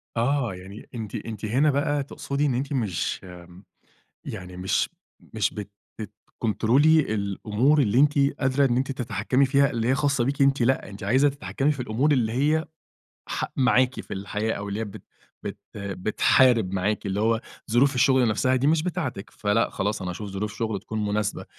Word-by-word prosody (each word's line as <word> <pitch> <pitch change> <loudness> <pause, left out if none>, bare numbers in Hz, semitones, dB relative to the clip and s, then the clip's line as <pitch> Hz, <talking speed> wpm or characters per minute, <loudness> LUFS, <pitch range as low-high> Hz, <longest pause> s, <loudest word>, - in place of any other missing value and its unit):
آه 120 -2 +1
يعني 95 +3 -11
أنتِ 110 -3 -5
أنتِ 110 -2 -5
هنا 135 +8 +3
بقى 145 0 0
تقصدي 140 +1 -3
إن 135 - +1
أنتِ 135 +3 -2
مش 100 -9 -1 1.0
يعني 90 0 -7
مش 95 +1 0 0.4
مش - - 0
بت 105 -1 -7 0.3
بتكنترولي 115 - +1
الأمور 105 +8 +1
اللي 115 +1 +2
أنتِ 145 0 +4 0.2
قادرة 135 +1 +2
إن 120 -1 +1
أنتِ 135 +1 -1
تتحكمي 125 +2 0
فيها 140 +1 +3
اللي 115 0 -1
هي 135 - +3
خاصة 140 -3 +1
بيكِ 140 +2 -1
أنتِ، 135 -1 +3
لأ، 130 -4 +1
أنتِ 100 0 -10
عايزة 130 +8 +3
تتحكمي 140 +1 -1
في 140 - -5
الأمور 125 +6 +1
اللي 115 -5 +2
هي 150 +6 +1 0.6
ح - - -2
معاكِ 130 0 +3
في - - -7
الحياة، 105 +3 -2
أو 100 0 -5
اللي 100 +2 -3
هي - - -1
بت 100 - -10 0.4
بت 100 0 -6 0.2
بتحارب 100 +2 +2
معاكِ 100 +2 -1
اللي 100 +1 -1
هو 115 +1 +2 0.3
ظروف 135 +4 +4
الشغل 125 0 +4
نفسها 130 +4 +2
دي 135 +3 +1
مش 155 0 +3
بتاعتِك، 165 - -4
فلأ 105 +2 0
خلاص 105 0 -2
أنا 90 - -3
هاشوف 100 +3 -6
ظروف 105 +2 -4
شُغل 110 -4 -2
تكون 110 0 -4
مناسبة، 105 0 -1
115 Hz, 175 wpm, -25 LUFS, 105-135 Hz, 1.0 s, أنتِ